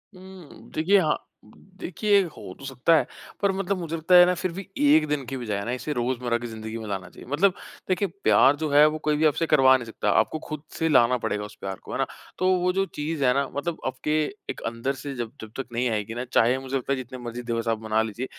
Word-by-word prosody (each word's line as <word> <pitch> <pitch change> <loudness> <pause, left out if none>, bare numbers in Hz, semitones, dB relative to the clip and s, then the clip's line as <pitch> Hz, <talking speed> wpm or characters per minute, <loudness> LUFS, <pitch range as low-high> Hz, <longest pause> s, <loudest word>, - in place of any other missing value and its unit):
हुँ, 185 -4 -13
देखिए 190 +6 +4
हाँ, 155 -4 +1 0.4
देखिए 195 +2 0
हो 155 - -9
तो 140 - -9
सकता 135 +5 +2
है। - - +3 0.4
पर 200 - +3
मतलब 195 0 -1
मुझे 165 -2 -4
लगता 165 +3 +3
है 175 0 +10
ना 180 - +2
फिर 180 0 -2
भी 190 +3 -7
1 270 - +5
दिन 145 -2 -1
की 135 +2 -5
बजाय 105 -5 -3
ना 120 - -2
इसे 130 +4 -3
रोज़मर्रा 120 -1 -1
की 120 0 -6
ज़िंदगी 110 0 -6
में 110 -2 -7
लाना 95 -2 -4
चाहिए। - - -14
मतलब 185 +7 +3 0.4
देखें 190 +2 +1 0.2
प्यार 135 +2 +5
जो 155 0 -3
है 145 +1 +7
वो 155 - -4
कोई 150 - +3
भी 160 - +2
आपसे 155 +2 +2
करवा 135 -4 +6
नहीं 120 - -7
सकता। 110 - -2
आपको 155 - 0
खुद 155 -1 -5 0.2
से 160 - +1
लाना 125 -3 +5
पड़ेगा 105 -3 -2
उस 105 - -12
प्यार 95 0 -4
को, - - -10
है - - -2
ना? - - +1 0.3
तो 185 - +1
वो 180 +1 +2
जो 195 0 +1
चीज़ 150 -3 -4
है 125 - +4
ना, 140 0 0
मतलब 165 +3 -2
आपके 150 +4 0 0.3
एक - - -5
अंदर 115 +4 -2
से 140 +1 -6
जब 120 -2 -4
जब 110 - -9
तक 135 - -2
नहीं 125 +1 0
आएगी 110 0 -2
ना 120 - -3
चाहे 120 +3 +4
मुझे 135 0 -5
लगता 135 +1 -2
है - - -1
जितने 130 0 -7
मर्जी 120 +1 -5
दिवस 115 -1 -2
आप 110 -1 0
मना 110 0 +1
लीजिए, 110 +3 -3
140 Hz, 250 wpm, -25 LUFS, 120-165 Hz, 0.4 s, है